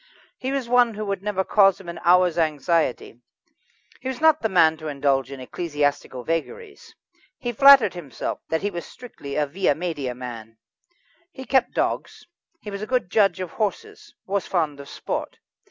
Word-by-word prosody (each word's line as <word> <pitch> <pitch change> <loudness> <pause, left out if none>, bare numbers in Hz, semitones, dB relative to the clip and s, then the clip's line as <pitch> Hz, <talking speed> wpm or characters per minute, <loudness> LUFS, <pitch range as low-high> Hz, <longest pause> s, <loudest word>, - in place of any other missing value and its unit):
He 260 - -3
was 275 -3 -2
one 240 -2 +3
who 215 +1 -4
would 195 -2 -3
never 200 -2 -1
cause 195 -1 +4
him 190 - -13
an 170 - -6
hour's 180 0 +4
anxiety; 155 -5 0 0.8
he - - -7
was 260 -2 -4
not 315 -1 +4
the 220 - 0
man 160 -4 +4
to 155 0 -8
indulge 140 -2 0
in 135 - -8
ecclesiastical 145 -2 -2
vagaries. 400 - -5 0.4
He 240 - -3
flattered 270 -4 +7
himself 160 -8 -5
that 160 +2 -1
he 205 - -1
was 170 -2 -5
strictly 150 - -10
a 150 - +1
via 155 +1 0
media 150 -7 -4
man. 115 -3 -9 0.7
He 265 -5 -9
kept 260 +1 +1
dogs, - - -2 0.4
he 210 - -8
was 200 0 -6
a 215 - -5
good 250 -9 -1
judge 195 -4 +3
of 185 -2 -5
horses, 210 -4 -4
was 195 0 -2
fond 155 -6 -1
of 140 - -10
sport. - - -5
180 Hz, 175 wpm, -23 LUFS, 145-220 Hz, 0.8 s, flattered